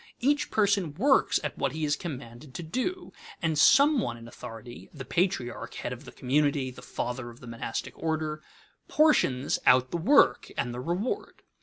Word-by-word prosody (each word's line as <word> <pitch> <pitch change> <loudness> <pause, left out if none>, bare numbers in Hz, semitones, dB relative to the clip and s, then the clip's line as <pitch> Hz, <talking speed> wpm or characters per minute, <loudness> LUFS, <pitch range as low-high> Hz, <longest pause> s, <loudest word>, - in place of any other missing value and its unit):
Each 285 +4 +1
person 200 -7 +1
works 265 - +3
at - - -4
what - - 0
he 155 0 -2
is 145 -1 +1
commanded 135 -4 -8
to 175 - -5
do, 305 - -3 0.3
and 160 -2 0
some 280 - +6
one 120 - -3
in 115 0 -11
authority 120 +1 -10
(the 135 -4 -9
patriarch, 170 -9 -1
head - - -4
of - - -11
the - - -10
community, 140 0 0
the 125 - -12
father 125 0 -4
of 120 +1 -14
the - - -12
monastic 115 -1 -5
order) 155 -1 -2 0.5
portions 145 - +3
out 125 0 +5
the - - -1
work 170 - +4
and 120 - -1
the 120 - -5
reward. 175 - -3
150 Hz, 175 wpm, -28 LUFS, 125-195 Hz, 0.5 s, some